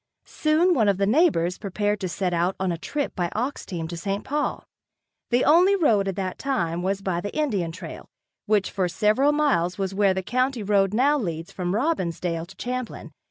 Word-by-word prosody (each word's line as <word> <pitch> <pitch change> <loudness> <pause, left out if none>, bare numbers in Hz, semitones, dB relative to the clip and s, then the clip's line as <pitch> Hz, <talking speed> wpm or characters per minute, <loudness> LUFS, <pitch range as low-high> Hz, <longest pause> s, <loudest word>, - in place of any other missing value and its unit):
Soon 320 +4 +2
one 220 -9 +3
of 195 - +2
the 200 - +2
neighbors 210 - +2
prepared 205 +1 -1
to 185 - -3
set 180 0 -2
out 175 +2 +1
on 190 -1 0
a 170 - -2
trip 285 - -3
by 175 -1 -1
ox 250 +6 -3
team 165 -3 -4
to 170 - -6
St. 195 +4 -3
Paul. 295 +1 -2 0.6
The 245 +1 +2
only 360 +6 +5
road 225 - +3
at 195 - -2
that 185 -2 -4
time 175 -11 -1
was 195 +2 -2
by 175 -3 -1
the 205 - -5
Indian 205 - 0
trail, 170 -1 -9 0.4
which 205 -2 +2
for 190 -3 0
several 215 +10 +3
miles 270 - +1
was 195 -1 -2
where 195 -1 +3
the 190 - -2
county 255 +2 0
road 195 -1 +2
now 280 +7 +3
leads 165 -6 -4
from 180 0 -2
Robbinsdale 175 - -1
to 190 - -14
Champlin. 250 -9 -5
200 Hz, 200 wpm, -24 LUFS, 180-255 Hz, 0.6 s, only